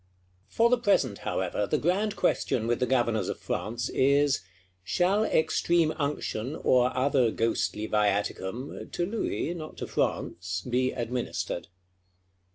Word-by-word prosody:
For 235 +1 +2
the 250 - +4
present, 140 - +2
however, 95 +2 -1
the - - +1
grand 200 +6 0
question 115 - +1
with 120 0 0
the 125 - +1
Governors 120 -3 +1
of - - -4
France 120 +3 -3
is: 140 -1 +3 0.4
Shall 180 - +2
extreme 165 -3 +2
unction, 145 -3 -2
or 125 -4 +3
other 130 -2 +3
ghostly 110 -1 -1
viaticum 105 +3 -1
(to 175 - 0
Louis, 200 -4 -2
not 155 -3 -8
to - - -4
France), 90 +1 -2
be 130 +1 +1
administered? 120 -7 -3
130 Hz, 130 wpm, -28 LUFS, 110-160 Hz, 0.4 s, the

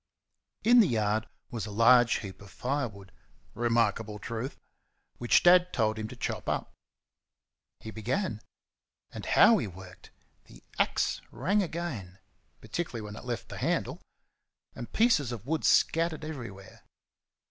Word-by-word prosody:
In 240 +2 +6
the 215 - +6
yard 110 -3 0 0.2
was 115 -3 -4
a - - -7
large 115 +2 +5
heap 95 -3 -9
of 100 - -13
firewood 120 -7 -4 0.4
remarkable 115 -2 0
truth! 115 +5 -5 0.6
which 120 - +3
Dad 180 0 +6
told 110 -2 0
him 110 - -3
to - - -10
chop - - -4
up. - - -3 1.1
He 110 - -7
began. 110 - -2 0.7
And - - -8
how 220 0 +6
he 115 - -3
worked! 90 0 -13 0.4
The - - -17 0.2
axe - - +1
rang 205 +3 0
again 155 - -5 0.4
particularly 160 -10 -4
when 105 0 -8
it - - -10
left 120 -2 -4
the - - -7
handle - - -1 0.7
and 120 - -8
pieces 220 - +3
of 115 -2 -7
wood 155 +2 -1
scattered 165 -1 +2
everywhere. 115 -11 -9
120 Hz, 135 wpm, -29 LUFS, 105-160 Hz, 1.1 s, In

